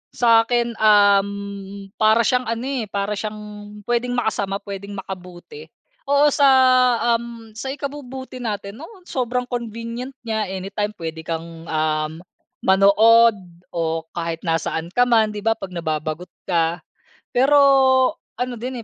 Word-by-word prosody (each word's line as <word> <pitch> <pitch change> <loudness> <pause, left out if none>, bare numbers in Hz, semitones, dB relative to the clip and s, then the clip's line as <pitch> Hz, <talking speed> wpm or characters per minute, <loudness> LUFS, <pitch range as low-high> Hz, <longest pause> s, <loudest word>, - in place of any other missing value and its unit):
Sa'kin, 235 0 +3
uhm, 200 -1 +2
para 220 +2 +4
siyang 250 +2 +1
ano 230 +1 -2
eh, 265 -5 -2
para 200 +1 -3
siyang 215 +1 -5 0.4
puwedeng 240 +2 -1
makasama, 205 -5 -1
puwedeng 200 0 -7
makabuti. 190 - -9 0.4
Oo 285 +1 +4
sa, 285 0 +4 0.7
uhm, 230 -1 -10
sa 225 +5 -7
ikabubuti 265 -2 -6
natin, 210 -2 -5
oo 365 +4 -12
sobrang 250 -6 -2
convenient 235 +1 -6
niya 220 -2 -2
anytime 200 +3 -4
puwede 160 -3 -6
kang, 165 0 -6
uhm, 155 +1 -1 0.4
manood 215 +4 +5 0.4
o 165 -1 -1
kahit 165 -1 -3
nasaan 165 0 -1
ka 245 - +5
man, 225 -3 +3
'di 205 - -6
ba 225 - +4
'pag 195 - -6
nababagot 155 +1 -3 0.2
ka. 170 -1 +1 0.5
Pero, 270 +4 +4 0.8
ano 250 0 -2
din 255 0 -4
215 Hz, 125 wpm, -21 LUFS, 190-245 Hz, 0.8 s, manood